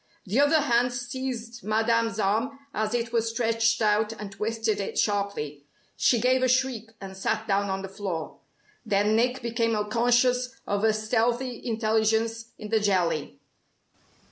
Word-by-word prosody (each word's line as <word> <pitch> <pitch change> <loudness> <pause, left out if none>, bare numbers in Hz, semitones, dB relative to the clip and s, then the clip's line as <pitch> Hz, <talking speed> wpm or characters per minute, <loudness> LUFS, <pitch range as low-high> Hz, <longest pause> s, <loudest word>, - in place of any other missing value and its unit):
The 210 +7 0
other 295 +2 +5
hand 245 -3 +2
seized 245 -2 -5
Madame's 225 0 +1
arm 220 +7 0 0.2
as 215 +2 -1
it 230 -1 -2
was 230 -1 +1
stretched 230 -1 +1
out, 210 0 +2
and 210 -3 -8
twisted 220 +1 -1
it 195 - -4
sharply. 200 -9 -1 0.3
She 240 - +3
gave 255 +2 +3
a 255 - +3
shriek, 255 -3 0
and 195 -1 -8
sat 215 +3 -2
down 200 -1 +1
on 190 0 -2
the - - -4
floor. 190 -5 -5 0.4
Then 210 -1 +2
Nick 245 +2 +1
became 230 -1 0 0.2
conscious 245 +2 +2
of 205 +1 -1
a 220 - +5
stealthy 235 +3 -1
intelligence 225 0 +1
in 210 - -8
the 220 0 +3
jelly. 180 -7 0
225 Hz, 150 wpm, -26 LUFS, 210-240 Hz, 0.4 s, other